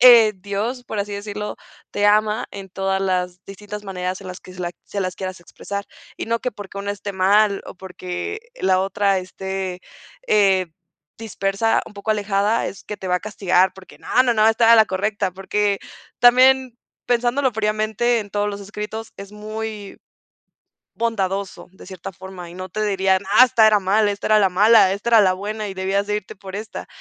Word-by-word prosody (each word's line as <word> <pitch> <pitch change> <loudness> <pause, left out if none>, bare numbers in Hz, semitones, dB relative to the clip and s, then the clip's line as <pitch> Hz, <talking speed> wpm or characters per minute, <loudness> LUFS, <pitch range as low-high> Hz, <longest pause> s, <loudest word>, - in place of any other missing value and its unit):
eh, 235 -3 +8
Dios, 205 +6 -3
por 220 -3 -6
así 205 0 -3
decirlo, 205 +1 -5 0.4
te 205 0 +2
ama 210 +1 +2
en 195 -1 -8
todas 195 +1 -1
las 180 -1 -2
distintas 205 +1 -9
maneras 185 -1 -4
en 195 - -10
las 180 -1 -8
que 185 - -13
se 180 - -14
las 175 0 -3
se 200 - -6
las 185 -2 -2
quieras 185 -1 -5
expresar, 200 +3 -7 0.3
y - - -5
no 230 +1 0
que 250 - -2
porque 200 -2 -9
uno 200 0 -3
esté 205 0 -5
mal, 200 +2 +3
o - - -9
porque 185 - -6 0.2
la 185 -1 +3
otra 195 0 +1
esté, 190 0 -5 0.5
eh, 195 -3 +3 0.5
dispersa, 220 0 0
un - - -11
poco 200 +2 -4
alejada, 205 +1 +1
es 195 - -7
que 210 - -6
te 190 - -8
va 180 0 +2
a - - -4
castigar, 190 -3 +2
porque 190 -1 -14
no, 255 +1 +2
no, 240 - +2
no, 215 0 +5
estaba 225 +1 +5
la 220 -2 +6
correcta, 200 0 -1
porque 200 +2 -1 0.4
también 255 0 +5 0.3
pensándolo 245 +2 +1
fríamente 215 +2 0
en 205 -2 -5
todos 205 0 0
los 200 0 -5
escritos, 210 +2 -6
es 200 0 -9
muy 215 -1 -7 1.0
bondadoso 200 -5 -2
de 190 - -14
cierta 185 -1 -8
forma, 190 -1 -10
y 170 - -12
no 185 0 -7
te 215 +4 -3
dirían: 190 -1 +2 0.2
"¡Ah!, 255 - +10
esta 225 -3 +4
era 215 -1 +5
mala, 205 +2 +2
esta 200 +1 -4
era 215 - +5
la 195 -2 +4
mala, 200 +1 +5
esta 215 +4 -3
era 230 - +7
la 185 -2 +4
buena 210 +2 -4
y 190 - -6
debías 195 +2 -1
de 210 0 0
irte 195 - -7
por 190 0 -8
esta". 215 +1 -7
200 Hz, 195 wpm, -21 LUFS, 190-215 Hz, 1.0 s, Ah